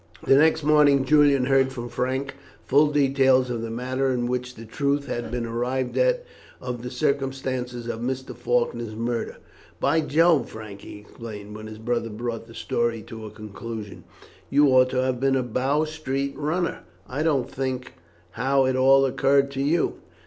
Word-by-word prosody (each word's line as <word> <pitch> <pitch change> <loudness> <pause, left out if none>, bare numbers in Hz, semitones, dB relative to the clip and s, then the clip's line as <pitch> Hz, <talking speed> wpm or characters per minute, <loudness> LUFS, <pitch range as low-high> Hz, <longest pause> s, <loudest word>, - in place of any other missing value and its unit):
The - - +5
next 155 +2 +4
morning 145 -2 +4
Julian 145 -2 +4
heard 135 0 +3
from 120 -2 -6
Frank 130 +3 -2 0.3
full 145 +3 +4
details 135 -3 +3
of 120 -2 -3
the 115 - -4
manner 130 +3 -1
in 125 -2 0
which 125 0 -3
the 115 - -10
truth 140 +4 -1
had 120 -4 -4
been 120 0 -3
arrived 125 +3 -2
at - - +2 0.3
of 125 -2 -5
the 125 - -5
circumstances 130 -2 -2
of 115 -1 -4
Mr. 130 +2 -4
Faulkner's 120 -2 -1
murder. 115 +1 -3 0.4
"By 155 +4 +2
Jove! 165 0 +3
Frank," 105 -3 -9
he - - -10
exclaimed, 105 -1 -9
when 110 0 -8
his 110 0 -9
brother 115 +1 -2
brought 115 +1 -5
the 115 - -13
story 115 -2 -1
to 115 -2 -9
a - - -7
conclusion; 110 0 -8 0.5
"you 145 0 +5
ought 130 -1 +5
to 130 0 0
have 130 -1 -1
been 135 0 +2
a 130 - +1
Bow 130 +5 0
Street 140 -3 -3
runner. 160 +5 -1 0.3
I 135 +4 -3
can't 145 -6 +1
think 130 -1 -4 0.4
how 135 +4 +2
it 130 0 +1
all 135 +1 +5
occurred 135 +1 +2
to 135 0 -3
you. 155 +4 +1
130 Hz, 175 wpm, -24 LUFS, 120-140 Hz, 0.5 s, The